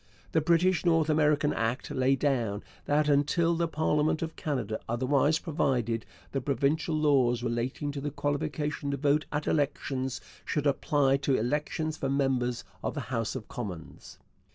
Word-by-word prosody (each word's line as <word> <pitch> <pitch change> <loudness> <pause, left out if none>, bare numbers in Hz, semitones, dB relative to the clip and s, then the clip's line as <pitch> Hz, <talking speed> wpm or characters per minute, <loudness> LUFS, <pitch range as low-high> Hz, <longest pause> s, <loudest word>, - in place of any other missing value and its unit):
The 160 - +3
British 170 +3 +3
North 165 -3 +3
America 150 -1 +3
Act 115 +2 -1
laid 130 +1 +2
down 120 -7 0 0.2
that, 150 +1 +2
until 150 +4 +3
the 170 0 0
parliament 155 0 +1
of 160 0 -5
Canada 120 -8 -2
otherwise 135 +6 +2
provided, 125 -9 -1 0.2
the 135 - -1
provincial 145 +5 0
laws 130 -6 +3
relating 125 +4 -2
to 140 -1 -5
the 145 - -2
qualification 145 +1 -2
to 140 - -1
vote 145 +1 +2
at 150 +1 -2
elections 135 -3 -1 0.2
should 150 -2 -2
apply 140 -1 +2
to 135 -1 +1
elections 150 +6 -1
for 135 - -2
members 130 -3 0 0.2
of - - -2
the - - -2
House 115 0 -1
of 120 -5 -6
Commons. 100 - -7
140 Hz, 155 wpm, -29 LUFS, 130-150 Hz, 0.2 s, The